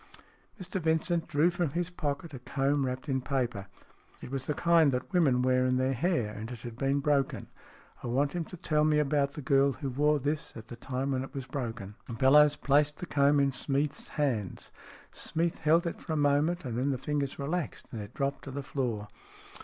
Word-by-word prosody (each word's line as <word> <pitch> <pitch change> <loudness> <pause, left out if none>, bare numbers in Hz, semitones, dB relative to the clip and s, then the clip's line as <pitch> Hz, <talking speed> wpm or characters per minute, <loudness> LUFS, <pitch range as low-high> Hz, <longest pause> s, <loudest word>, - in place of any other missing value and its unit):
Mr 185 0 -4
Vincent 160 +1 +1
drew 160 +2 +3
from 175 -2 0
his 175 +1 -2
pocket 150 -2 -3
a 130 - -6
comb 135 +2 0
wrapped 130 +3 -4
in 130 -2 0
paper. 125 -7 -2 0.5
It - - -9
was 135 0 -4
of 150 - +1
the - - -7
kind 170 -4 +5
that 125 +8 -3
women 135 -8 +3
wear 130 0 +3
in 130 0 +2
their 130 +1 +1
hair, 125 - 0
and 110 +2 -6
it 120 -3 -8
had 120 -2 -7
been 135 +3 0
broken. 140 -2 0 0.3
" - - -25
I - - -3
want 140 +4 +1
him 175 -1 -1
to 180 - -10
tell 155 -2 +1
me 155 0 +3
about 140 -1 +1
the 150 - -7
girl 135 +1 +3
who 135 +1 -4
wore 150 +3 +3
this 145 +2 -2
at 110 0 -11
the 120 - -7
time 130 +3 -3
when 130 -1 0
it 135 +1 -10
was 135 -2 -4
broken." 115 -6 -5
STORIES - - -20
IN 115 - -4
GREY - - -12
Bellowes 150 +2 +6
placed 145 +1 +2
the - - -5
comb 145 -2 +3
in 140 -1 +3
Smeath's 140 +2 -1
hands. 120 -10 -2 0.4
Smeath 165 +1 -2
held 165 +3 +3
it 170 - -4
for 160 - -4
a - - 0
moment, 145 +4 +2
and 120 -1 -2
then 135 +3 +1
the 135 - 0
fingers 140 0 -2
relaxed, 155 +4 -3
and 115 - -5
it 100 - -10
dropped 140 0 -2
to - - -6
the 140 +1 -5
floor. 120 -7 -2
140 Hz, 225 wpm, -30 LUFS, 130-150 Hz, 0.5 s, Bellowes